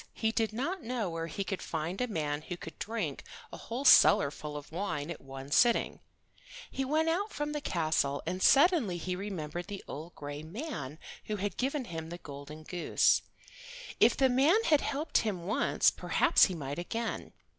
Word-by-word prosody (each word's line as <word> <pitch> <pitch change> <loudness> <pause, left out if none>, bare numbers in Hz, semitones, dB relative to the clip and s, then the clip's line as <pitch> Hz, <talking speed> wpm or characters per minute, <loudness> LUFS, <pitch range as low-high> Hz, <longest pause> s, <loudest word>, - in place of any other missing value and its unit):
He 220 -1 0
did 225 -1 0
not 315 - -3
know 230 -7 -2
where 165 0 -3
he 195 +5 -3
could 195 -1 -4
find 165 +5 -3
a 250 - +1
man 150 -7 -2
who 175 +3 -6
could 165 - -10
drink 210 -11 -3 0.3
a - - -6
whole 250 +5 -5
cellar 200 - +7
full 150 0 -7
of 145 - -10
wine 165 -4 -3
at 170 - -7
one 135 +1 -9
sitting. 235 +6 +3 0.7
He 270 - -2
went 310 +4 +1
out 390 +6 0
from 295 0 -3
the 295 -1 -3
castle, 155 - 0
and 185 +1 -3
suddenly 280 - +5
he 180 +2 -3
remembered 175 -3 -5
the 200 -1 -7
old 160 +4 -8
gray 145 0 -6
man 160 - -6 0.3
who 215 - -2
had 200 -2 -3
given 270 +1 -1
him 165 -3 -6
the 175 - -6
golden 150 0 -10
goose. 175 +2 +2 0.8
If - - +5
the 270 - +4
old 260 - +4
man 305 - +4
had 300 -3 +4
helped 295 +2 0
him 195 -6 -2
once 210 +4 +3
perhaps - - +4
he 185 - -3
might 145 -1 -5
again. 225 +6 -4
185 Hz, 190 wpm, -31 LUFS, 155-250 Hz, 0.8 s, cellar